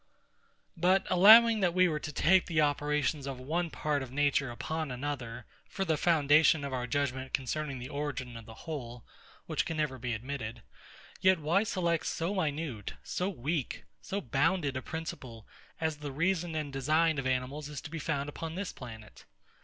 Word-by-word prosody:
But, 185 +3 +3
allowing 220 +5 +8
that 180 -3 +1
we 185 0 +5
were 155 -3 -1
to 150 - -5
take 180 +5 +4
the 160 -3 0
operations 150 -1 +1
of 135 -2 -5
one 165 +6 -1
part 150 -2 -1
of 130 -2 -7
nature 145 -1 +1
upon 155 +5 -3
another, 125 -3 -5 0.2
for 195 - -2
the 160 - +2
foundation 155 -1 +4
of 140 - -4
our 125 -1 -2
judgement 130 0 -2
concerning 140 +1 -2
the 125 +2 -7
origin 140 -4 -4
of 115 -1 -10
the 110 - -10
whole, 125 -7 -6 0.4
(which - - -1
never 150 -5 -1
can - - -17
be 125 -1 -2
admitted,) 120 -1 -6 0.6
yet 185 0 +5
why 160 +6 +2
select 175 -6 0
so 170 +4 -1
minute, 150 - -2
so 180 +2 -2
weak, 155 -4 -3 0.2
so 200 - -3
bounded 145 +1 +1
a 130 - -2
principle, 130 -8 -7 0.3
as 160 -2 -1
the 145 -1 -6
reason 170 +2 0
and 150 -3 -3
design 155 +3 +2
of 130 - -2
animals 130 +3 -2
is 150 -2 -5
found 155 -2 -3
to 145 - -6
be - - -22
upon 165 0 -5
this 195 0 -4
planet? 110 -4 -11
150 Hz, 175 wpm, -31 LUFS, 130-165 Hz, 0.6 s, allowing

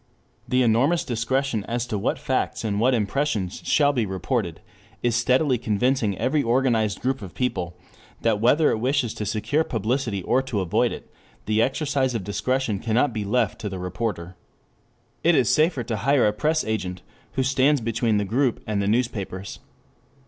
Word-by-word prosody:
The 125 0 +2
enormous 135 +10 +2
discretion 120 -1 -1
as 120 0 -2
to 115 - -4
what - - 0
facts - - -1
and 105 -2 -1
what 125 +3 +3
impressions 105 -4 -1
shall 145 -1 +3
be 120 -6 0
reported 95 -1 -2 0.4
is 120 -2 +2
steadily 130 +2 +2
convincing 110 -2 0
every 145 +3 +1
organized 115 -5 +1
group 130 0 0
of 95 -3 -9
people 90 -9 -2 0.4
that 110 -2 +1
whether 145 +7 +4
it 110 - -1
wishes 125 -1 0
to 105 - -4
secure 110 +9 0
publicity 115 - -2
or 130 +8 +2
to 130 -6 -3
avoid 95 -3 +1
it, - - -9 0.3
the 110 +1 +2
exercise 135 0 0
of 110 - -2
discretion 110 +2 -1
cannot 120 +5 +1
be 110 -2 -2
left 110 +2 0
to 105 - -3
the 95 - -5
reporter. 90 -1 -4 0.9
It 170 0 +4
is 130 -6 +3
safer 155 -4 +2
to 110 -1 -3
hire 135 +4 +3
a 105 - +2
press 155 +8 +1
agent 90 -5 -3 0.3
who 130 - 0
stands 135 +2 +3
between 115 -1 0
the 105 - 0
group 125 +4 0
and 105 -2 -1
the 100 - -1
newspapers. 105 -4 -2
115 Hz, 170 wpm, -24 LUFS, 105-130 Hz, 0.9 s, whether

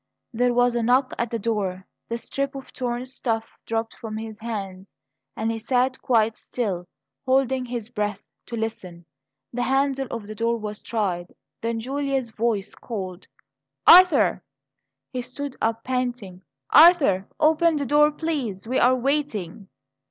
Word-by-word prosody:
There 245 +2 +2
was 245 0 +3
a 240 - 0
knock 250 +3 +2
at 235 - 0
the 230 - -2
door. 195 -4 -2 0.2
The 235 - -1
strip 275 +4 -3
of 270 -1 -9
torn 245 0 -3
stuff 230 -3 -2 0.2
dropped 225 0 -2
from 215 -1 -6
his 220 -1 -7
hands, 195 -4 -6 0.4
and 225 +1 -1
he 225 - -3
sat 255 +3 0
quite 225 -3 +2
still, 190 -8 -3 0.4
holding 260 -1 +2
his 240 -2 -5
breath 210 -4 -2 0.3
to 235 - -5
listen. 185 -6 -5 0.5
The 245 - -2
handle 270 +1 +1
of 230 -3 -5
the 215 - -7
door 230 +2 0
was 210 -1 -6
tried; 185 -6 -2 0.3
then 230 0 -1
Julia's 270 0 -2
voice 220 -3 -1
called: 190 -5 -6 0.6
"Arthur!" 360 0 +7 0.7
He 250 - -2
stood 260 +3 -6
up, 225 0 0
panting. 245 -8 -3 0.3
"Arthur, 300 - +6
open 320 +1 +4
the 285 -1 -1
door, 295 +3 +5
please; 285 - -3
we 255 +3 0
are 250 +1 +5
waiting." 245 - -2
235 Hz, 150 wpm, -24 LUFS, 215-260 Hz, 0.7 s, Arthur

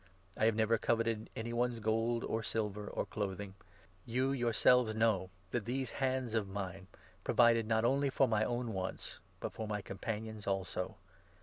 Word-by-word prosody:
I 110 - +2
have 110 -1 +4
never 110 0 +3
coveted 115 -1 0
any 115 +1 -3
one's 120 0 0
gold 115 +2 +1
or 110 - -1
silver 105 -1 -2
33 - - -6
or - - +1
clothing. 100 -1 -4 0.5
You, 130 +5 0
yourselves, 120 -2 +4
know 110 -4 +2 0.2
that 120 -4 -1
these 130 +2 -2
hands 130 -3 -1
of 110 -3 +1
mine 95 -1 -5
34 - - -19 0.3
provided 115 -2 +4
not 110 0 +2
only 140 +3 +3
for 135 0 +3
my 110 -2 +2
own 120 0 -1
wants, 95 -1 -4 0.2
but - - -4
for 110 - -4
my 105 -1 -2
companions 110 +1 -5
also. 95 -1 -2
110 Hz, 175 wpm, -34 LUFS, 105-120 Hz, 0.5 s, have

